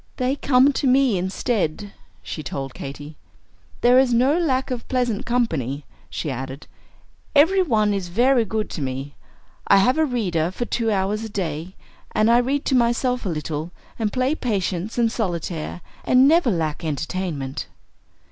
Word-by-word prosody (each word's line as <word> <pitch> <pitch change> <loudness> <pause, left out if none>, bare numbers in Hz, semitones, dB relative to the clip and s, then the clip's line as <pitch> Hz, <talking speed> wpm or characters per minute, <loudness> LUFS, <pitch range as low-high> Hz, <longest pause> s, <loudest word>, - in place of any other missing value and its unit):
"They 255 +2 0
come 275 0 +4
to 275 - 0
me 260 -3 +4
instead," 195 - -2 0.3
she 155 - -5
told 135 -2 -5
Katy. 145 +3 -8 0.6
"There 245 +1 +6
is 260 -2 +3
no 255 +5 +3
lack 265 -7 0
of 245 -2 -4
pleasant 245 -5 -1
company," 150 - -1 0.2
she 150 - -3
added; 130 +2 -6 0.7
"every 345 +7 +5
one 215 - +2
is 195 -3 -2
very 240 +7 +3
good 220 0 -2
to 160 - -5
me. 135 +1 -4 0.5
I 200 - +6
have 250 +10 +3
a 315 - +4
reader 185 - 0
for 215 +6 -4
two 230 -1 -1
hours 205 +1 0
a 220 - -5
day, 175 -3 -4 0.4
and 215 +2 +3
I 240 - +6
read 275 +3 -1
to 265 - +2
myself 245 -1 +1
a - - 0
little, 155 0 -3 0.3
and 215 -2 0
play 255 +5 +1
Patience 200 - -2
and 230 -2 +2
Solitaire, 175 -5 -3 0.2
and 255 +2 +5
never 325 -3 +4
lack 160 -6 -2
entertainment." 155 -3 -3
215 Hz, 160 wpm, -22 LUFS, 165-250 Hz, 0.7 s, There